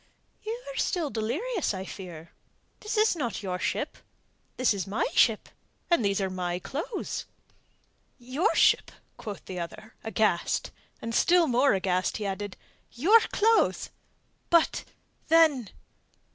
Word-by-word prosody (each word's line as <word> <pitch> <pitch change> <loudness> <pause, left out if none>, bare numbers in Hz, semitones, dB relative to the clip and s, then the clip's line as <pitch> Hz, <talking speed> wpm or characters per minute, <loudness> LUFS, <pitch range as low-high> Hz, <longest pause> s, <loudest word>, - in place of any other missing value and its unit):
"You 450 +2 -4
are - - -8
still 330 -7 0
delirious, 300 - -1
I 190 0 -5
fear. 170 -5 -9 0.5
This 425 +1 -4
is 430 -3 +4
not 240 -9 -3
your 180 -2 -3
ship. - - -2 0.6
This 255 -3 +3
is 195 -3 -4
my 200 - 0
ship, 220 -2 +3 0.4
and 340 -9 +4
these 200 -1 +1
are 195 - 0
my 180 -1 -2
clothes." 300 - -4 0.9
"Your 270 - 0
ship?" - - +4 0.3
quoth 205 -4 -7
the 185 -1 -6
other, 175 +6 -7
aghast, 215 -5 0 0.3
and 230 0 -3
still 345 +6 +4
more 255 -3 +3
aghast 185 -1 0
he 215 - -4
added: 200 0 -4 0.3
"Your 375 - +6
clothes? 445 +1 +2 0.6
But... 335 -1 +3 0.4
then...." 310 - +4
230 Hz, 130 wpm, -28 LUFS, -, 0.9 s, Your